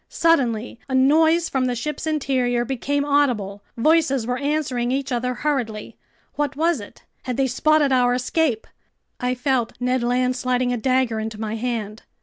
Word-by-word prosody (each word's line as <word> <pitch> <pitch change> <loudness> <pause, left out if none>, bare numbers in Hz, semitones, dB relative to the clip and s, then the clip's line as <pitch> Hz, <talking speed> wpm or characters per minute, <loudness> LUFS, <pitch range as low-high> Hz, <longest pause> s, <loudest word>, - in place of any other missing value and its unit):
Suddenly 245 -9 +1
a 260 - -1
noise 320 +5 +4
from 265 -1 0
the 250 -1 -1
ship's 300 +6 -4
interior 255 -5 0
became 280 +3 -1
audible. 245 -9 +1 0.2
Voices 275 -2 +2
were 250 +1 -2
answering 275 -4 -1
each 275 +1 -2
other 250 +1 -1
hurriedly. 245 -8 -2 0.4
What 290 -2 -2
was 325 -1 +1
it? 205 - -13 0.2
Had 250 -2 -3
they 270 - +2
spotted 295 +3 +2
our 245 -1 +3
escape? 250 -1 0 0.5
I 250 0 -1
felt 250 -2 0
Ned 250 0 0
Land 250 +1 +1
sliding 250 0 0
a - - -1
dagger 255 -2 +1
into 220 -1 -5
my 220 0 -3
hand. 225 -2 -4
255 Hz, 160 wpm, -22 LUFS, 240-285 Hz, 0.5 s, noise